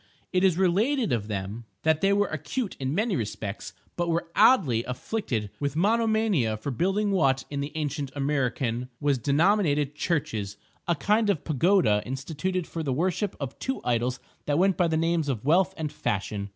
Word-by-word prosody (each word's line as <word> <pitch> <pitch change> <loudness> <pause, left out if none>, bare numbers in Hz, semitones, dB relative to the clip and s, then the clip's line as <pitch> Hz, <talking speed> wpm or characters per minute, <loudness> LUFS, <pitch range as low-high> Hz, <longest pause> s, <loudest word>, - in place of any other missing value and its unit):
It 185 0 +2
is 185 -3 +4
related 210 - +2
of 105 -3 -1
them 105 +2 -4 0.2
that 160 -1 +2
they 195 - +3
were 205 +1 +3
acute 200 - -3
in 135 +2 -2
many 215 0 +1
respects, 105 -4 -4 0.2
but 175 -1 -1
were 170 0 -1
oddly 170 - +5
afflicted 125 - -3
with 140 -1 -2
monomania 215 - +2
for 140 +6 -4
building 195 - 0
what, 135 -8 +2
in 140 - -3
the 140 +1 -4
ancient 145 -2 -3
Amriccan, 130 -3 -1
was 145 -3 +1
denominated 150 - +2
"churches"—a 145 - -3
kind 210 +8 +2
of 180 -8 0
pagoda 150 - +3
instituted 155 +7 -3
for 165 - -5
the 145 -4 -2
worship 180 +7 -1
of 140 -3 -6
two 265 - -2
idols 125 +1 0 0.3
that 145 0 +2
went 190 +1 +3
by 175 - +2
the 160 -1 0
names 165 -2 +1
of 125 -3 -3
Wealth 180 +5 +4
and 155 -3 -3
Fashion. 100 0 -3
150 Hz, 170 wpm, -26 LUFS, 125-190 Hz, 0.3 s, oddly